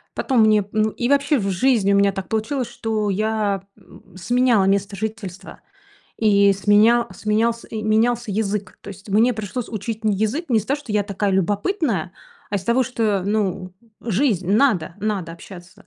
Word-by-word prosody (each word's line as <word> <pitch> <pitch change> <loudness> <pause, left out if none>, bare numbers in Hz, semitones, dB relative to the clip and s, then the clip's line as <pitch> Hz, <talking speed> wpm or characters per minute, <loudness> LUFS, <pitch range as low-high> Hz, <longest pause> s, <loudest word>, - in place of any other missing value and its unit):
Потом 255 -5 +1
мне, 215 -2 +4
ну, 215 0 +2
и 240 - -2
вообще 280 +1 +3
в 195 -1 -2
жизни 200 0 +2
у - - +4
меня 200 0 +3
так 195 0 -6
получилось, 225 +4 -2
что 215 -2 -2
я, 205 -1 -1
м, - - -18
сменяла 240 0 +2
место 200 +1 0
жительства 200 -4 -6 0.6
и 200 -2 +4
сменя 215 +4 +3
сменялся 225 +2 -1
менялся 220 +1 0
язык. 200 -2 -3
То - - -11
есть 200 +1 -11
мне 225 +5 +3
пришлось 220 +3 -5
учить 220 +1 -5
не 210 -2 +2
язык 220 - -1
не 225 -3 +3
с 205 - -11
того, 280 +2 0
что 245 -7 -8
я 210 -1 +2
такая 200 0 -2
любопытная, 200 - -1 0.4
а, 205 - -3
из 190 - -4
того, 245 +2 +2
что 220 -6 -1
ну 195 -3 -1 0.3
жизнь, 215 - 0
надо, 205 - +2
надо 195 -5 -2
общаться. 175 +1 -13
215 Hz, 170 wpm, -21 LUFS, 195-230 Hz, 0.6 s, мне